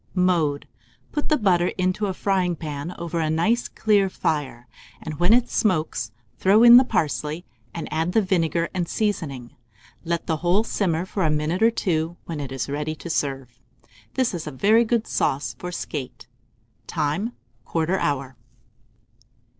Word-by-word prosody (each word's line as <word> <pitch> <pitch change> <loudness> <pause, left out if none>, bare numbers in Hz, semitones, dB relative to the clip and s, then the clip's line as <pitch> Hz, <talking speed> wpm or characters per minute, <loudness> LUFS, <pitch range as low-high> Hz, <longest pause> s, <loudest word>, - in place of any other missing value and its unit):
Mode. 170 -6 +1 0.4
Put 295 - -2
the 305 - +4
butter 180 -6 +3
into 185 +3 0
a 190 - -2
fryingpan 175 -5 -1
over 170 0 -3
a 160 -1 0
nice 220 +10 +1
clear 205 -3 +2
fire, 140 -9 -2 0.3
and 155 -1 -7
when 175 +3 +3
it 240 +1 +5
smokes, 155 - 0 0.3
throw 205 +4 +5
in 240 0 +10
the 255 - +7
parsley, 155 - -1 0.3
and 165 - -5
add 165 +3 0
the 220 - +4
vinegar 170 -3 +1
and 180 -3 -2
seasoning. 145 - -2 0.5
Let 170 0 -2
the 160 - 0
whole 175 +6 +2
simmer 180 -6 -1
for 190 0 -2
a 160 - +3
minute 150 +5 0
or 225 - +6
two, 170 -6 -1
when 165 -3 -5
it 140 -2 -5
is 135 -2 -3
ready 150 +2 -3
to 170 +2 -6
serve. 135 -4 -3 0.5
This 260 -5 +1
is 165 -3 -5
a - - -4
very 215 - +4
good 230 0 +1
sauce 130 -3 -1
for 180 - -5
skate. 130 -7 -6 0.6
Time. 170 +9 -1 0.3
1/4 165 +3 0
hour. 135 -2 -2
170 Hz, 160 wpm, -24 LUFS, 150-195 Hz, 0.6 s, in